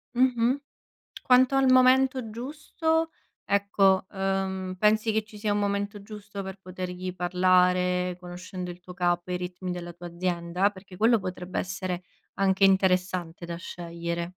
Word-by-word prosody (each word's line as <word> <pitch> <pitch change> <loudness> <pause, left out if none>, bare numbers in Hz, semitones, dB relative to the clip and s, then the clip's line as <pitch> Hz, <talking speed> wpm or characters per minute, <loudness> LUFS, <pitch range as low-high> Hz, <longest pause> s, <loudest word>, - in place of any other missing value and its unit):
mh-mh, 250 -1 +3 0.7
quanto 255 +1 +5
al 270 -1 +4
momento 255 -1 +4
giusto, 310 +6 -1 0.3
ecco, 195 -1 +3
uhm, 190 -1 -2
pensi 215 +2 +3
che 220 0 +1
ci 210 0 -14
sia 210 0 -1
un 205 - 0
momento 200 0 -1
giusto 205 -1 -8
per 190 0 -7
potergli 185 0 -5
parlare, 180 0 +2
conoscendo 180 0 -7
il 175 - -12
tuo 180 0 -11
capo 175 -1 0
e - - 0
i - - 0
ritmi 180 0 -5
della 175 -1 -6
tua 175 +1 -9
azienda? 175 +2 0
Perché 190 -1 -13
quello 225 +3 +4
potrebbe 185 -1 -5
essere 185 -1 -3 0.3
anche 195 0 +2
interessante 185 -3 +1
da 170 0 -5
scegliere. 170 -1 -5
190 Hz, 145 wpm, -27 LUFS, 180-210 Hz, 0.7 s, quanto